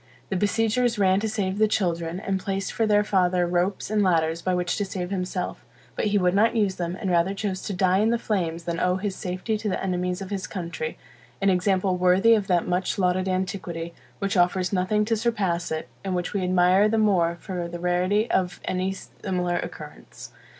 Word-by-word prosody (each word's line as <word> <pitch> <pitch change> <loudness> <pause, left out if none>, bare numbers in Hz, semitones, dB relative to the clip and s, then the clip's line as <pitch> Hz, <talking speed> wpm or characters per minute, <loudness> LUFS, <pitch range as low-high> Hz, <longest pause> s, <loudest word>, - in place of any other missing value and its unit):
The 195 - -1
besiegers 225 +4 +1
ran 190 -1 +3
to 220 +1 -2
save 200 -2 -2
the 215 - +5
children, 170 -4 -1
and 195 -1 -2
placed 195 0 -3
for 225 - +1
their 210 -1 +4
father 180 -3 +2
ropes 180 +4 -1
and 215 -1 +2
ladders, 165 -3 +2
by 185 +1 0
which 180 0 0
to 205 - 0
save 185 -2 -4
himself, 180 -2 -3 0.3
but - - -1
he 205 -1 +2
would 180 -2 +2
not 220 +4 +3
use 205 -4 +1
them, 175 +1 -3
and 190 - -2
rather 175 +3 +2
chose 195 -2 -3
to 205 - -4
die 185 0 +2
in 215 +2 +3
the 235 - +2
flames 170 -7 -2
than 170 0 -3
owe 180 0 +2
his 190 0 -3
safety 185 +4 -3
to 215 -1 -2
the 185 - -1
enemies 180 -1 -1
of 195 0 -7
his 195 -1 -3
country: 170 -4 -5 0.4
an 195 0 +3
example 185 0 +1
worthy 185 +5 +5
of 210 -3 +1
that 175 -3 +1
much 180 +1 0
lauded 185 0 +1
antiquity, 180 -3 -3 0.2
which 200 +1 -2
offers 180 +1 +2
nothing 200 +3 +1
to 225 +1 +1
surpass 205 -7 -1
it, 160 0 -3 0.2
and 190 -2 -2
which 180 0 -2
we 200 - 0
admire 185 +3 +4
the 225 - +1
more 185 -6 +3
from 180 -3 -4
the 175 0 -6
rarity 180 +5 +1
of 185 0 0
any 185 +1 -1
similar 180 -2 -3
occurrence. - - -8
185 Hz, 205 wpm, -25 LUFS, 180-205 Hz, 0.4 s, the